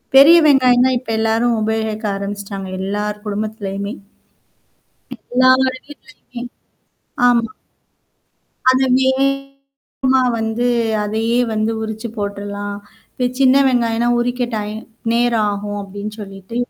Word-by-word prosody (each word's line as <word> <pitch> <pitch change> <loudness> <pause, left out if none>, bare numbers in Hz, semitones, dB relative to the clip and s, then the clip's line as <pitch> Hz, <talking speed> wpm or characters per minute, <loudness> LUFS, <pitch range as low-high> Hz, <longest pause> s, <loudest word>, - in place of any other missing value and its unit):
பெரிய 285 +5 +9
வெங்காயம் 255 -3 +5
தான் 255 - +1
இப்ப 250 - -14
எல்லாரும் 225 +2 +1
உபயோகிக்க 220 0 -2
ஆரம்பிச்சுட்டாங்க. 200 -1 -5
எல்லார் 210 +2 -3
குடும்பத்துலயுமே. 205 -1 -4 1.4
எல்லார் 255 +1 +5 0.2
வீட்லயுமே 260 -4 -12 0.9
ஆமா. 235 -1 +2 1.2
அது 260 +1 +3 0.2
வேகமா 275 0 -1 0.2
வந்து 225 +2 -1 0.4
அதையே 225 +3 0 0.2
வந்து 215 +1 0
உரிச்சு 220 +1 -5
போட்டுறலாம். 205 0 -4 0.5
இ - - +3
சின்ன 260 0 +5
வெங்காயனா 235 -1 +1
உரிக்க 245 +1 -1
டை 210 -1 -3 0.4
நேரகும் 210 -4 0
அப்டின்னு 205 +2 -7
சொல்லிட்டு. 195 +2 -9
225 Hz, 95 wpm, -18 LUFS, 205-255 Hz, 1.4 s, பெரிய